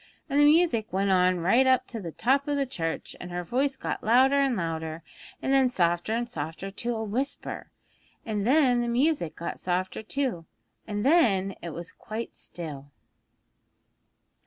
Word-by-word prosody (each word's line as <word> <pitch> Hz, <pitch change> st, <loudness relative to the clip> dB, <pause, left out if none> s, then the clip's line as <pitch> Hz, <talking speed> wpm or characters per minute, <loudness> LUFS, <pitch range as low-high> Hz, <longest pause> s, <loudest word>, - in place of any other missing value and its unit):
And 280 Hz, -, +1 dB
the 290 Hz, -, +7 dB
music 295 Hz, -8 st, +3 dB
went 195 Hz, +2 st, +1 dB
on 180 Hz, -1 st, +3 dB
right 235 Hz, +10 st, +4 dB
up 260 Hz, -1 st, +4 dB
to 230 Hz, -, -5 dB
the 170 Hz, -3 st, -6 dB
top 270 Hz, -, +1 dB
of 290 Hz, -1 st, 0 dB
the 280 Hz, -, +1 dB
church, 165 Hz, -10 st, -4 dB
and 175 Hz, -, -7 dB
her 175 Hz, 0 st, -4 dB
voice 265 Hz, +8 st, 0 dB
got -, -, -4 dB
louder 255 Hz, +5 st, +5 dB
and 275 Hz, -3 st, +2 dB
louder, 160 Hz, -2 st, -3 dB, 0.4 s
and 270 Hz, -, +1 dB
then 265 Hz, -2 st, +4 dB
softer 175 Hz, -3 st, +1 dB
and 235 Hz, +1 st, 0 dB
softer 165 Hz, +1 st, -5 dB
to 235 Hz, +4 st, -3 dB
a 220 Hz, -, -3 dB
whisper, 250 Hz, +7 st, -3 dB, 0.6 s
and 210 Hz, -2 st, -2 dB
then 260 Hz, -3 st, +4 dB
the 240 Hz, -, -1 dB
music 245 Hz, -, +1 dB
got 170 Hz, -, -5 dB
softer 185 Hz, +2 st, -2 dB
too, 220 Hz, -, -3 dB, 0.4 s
and 205 Hz, +1 st, -3 dB
then 205 Hz, -, +3 dB
it 170 Hz, -, -5 dB
was 165 Hz, +1 st, -7 dB
quite 220 Hz, +2 st, -7 dB
still.' 145 Hz, -5 st, -8 dB
220 Hz, 170 wpm, -27 LUFS, 175-265 Hz, 0.6 s, the